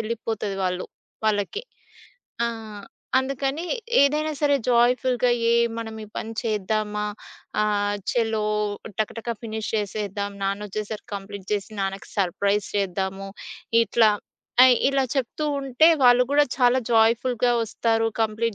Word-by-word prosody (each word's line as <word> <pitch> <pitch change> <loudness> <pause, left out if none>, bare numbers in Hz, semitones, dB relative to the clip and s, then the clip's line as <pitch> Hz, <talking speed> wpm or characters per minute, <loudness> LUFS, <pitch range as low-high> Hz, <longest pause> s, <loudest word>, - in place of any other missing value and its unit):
వెళ్ళిపోతది 215 -3 -3
వాళ్ళు 180 0 -2 0.4
వాళ్ళకి. 215 - 0 0.8
ఆ! - - +2 0.7
అందుకని 275 +3 -2 0.4
ఏదైనా 300 +2 +2
సరే 285 -1 +4
జాయ్‌ఫుల్‌గా 245 +1 +3 0.2
"ఏయ్! 235 0 +4
మనం 225 -1 -5
ఈ - - -12
పని 225 - -4
చేద్దామా? 210 -1 -1 0.6
ఆహ్, 205 -1 +1
ఛలో 225 -3 0 0.5
టకటక 230 +2 -2
ఫినిష్ 220 -1 -4
చేసేద్దాం, 205 -1 -3
నాన్నొచ్చేసరికి 210 +2 -4
కంప్లీట్ 200 -1 -9
జేసి 205 +1 -2
నాన్నకి 195 0 -4
సర్‌ప్రైజ్ 200 +2 +1
చేద్దాము." 195 0 -2 0.6
ఇట్లా 225 -1 +4 0.5
ఐ - - +8 0.2
ఇలా 275 -1 +2
చెప్తూ 270 +3 -2
ఉంటే 275 +3 +3 0.2
వాళ్ళు 245 0 +7
కూడా 290 +1 +5
చాలా 250 0 +4
జాయ్‌ఫుల్‌గా 235 +2 +3
వస్తారు. 225 0 0
కంప్లీట్ 220 0 0
220 Hz, 115 wpm, -24 LUFS, 205-245 Hz, 0.8 s, ఐ